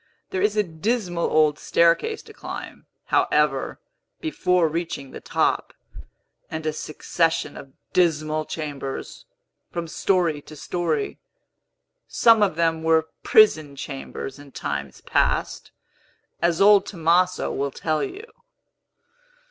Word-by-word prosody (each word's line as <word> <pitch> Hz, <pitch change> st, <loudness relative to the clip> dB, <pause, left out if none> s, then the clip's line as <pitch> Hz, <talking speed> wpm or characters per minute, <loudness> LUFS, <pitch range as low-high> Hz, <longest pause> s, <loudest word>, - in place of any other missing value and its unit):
There 185 Hz, -, -1 dB
is 210 Hz, +1 st, +1 dB
a 210 Hz, -, +4 dB
dismal 175 Hz, 0 st, -1 dB
old 155 Hz, -1 st, +3 dB
staircase 170 Hz, -, +2 dB
to -, -, -14 dB
climb, -, -, -8 dB, 0.2 s
however, 150 Hz, -3 st, +1 dB, 0.4 s
before 180 Hz, -, +1 dB
reaching 160 Hz, -4 st, -4 dB
the -, -, -9 dB
top, -, -, 0 dB, 0.7 s
and 160 Hz, 0 st, -5 dB
a 155 Hz, -, 0 dB
succession 160 Hz, +2 st, -1 dB
of 135 Hz, -1 st, -11 dB, 0.2 s
dismal 155 Hz, -3 st, +1 dB
chambers, 145 Hz, -4 st, -6 dB, 0.4 s
from 170 Hz, -1 st, -4 dB
story 170 Hz, -3 st, +1 dB
to 155 Hz, -, -13 dB
story. 175 Hz, -, -2 dB, 0.9 s
Some 225 Hz, -2 st, +5 dB
of 195 Hz, -6 st, +2 dB
them 165 Hz, -1 st, +1 dB
were 160 Hz, 0 st, +2 dB
prison 155 Hz, -10 st, +4 dB
chambers 135 Hz, 0 st, -7 dB
in 140 Hz, -2 st, -14 dB
times 70 Hz, -2 st, -4 dB
past, -, -, 0 dB, 0.7 s
as 170 Hz, -1 st, +2 dB
old 200 Hz, 0 st, +6 dB
Tomaso 180 Hz, +1 st, +1 dB
will 140 Hz, +1 st, -1 dB
tell 155 Hz, +2 st, -1 dB
you." 405 Hz, +5 st, -6 dB
165 Hz, 115 wpm, -24 LUFS, 150-185 Hz, 0.9 s, old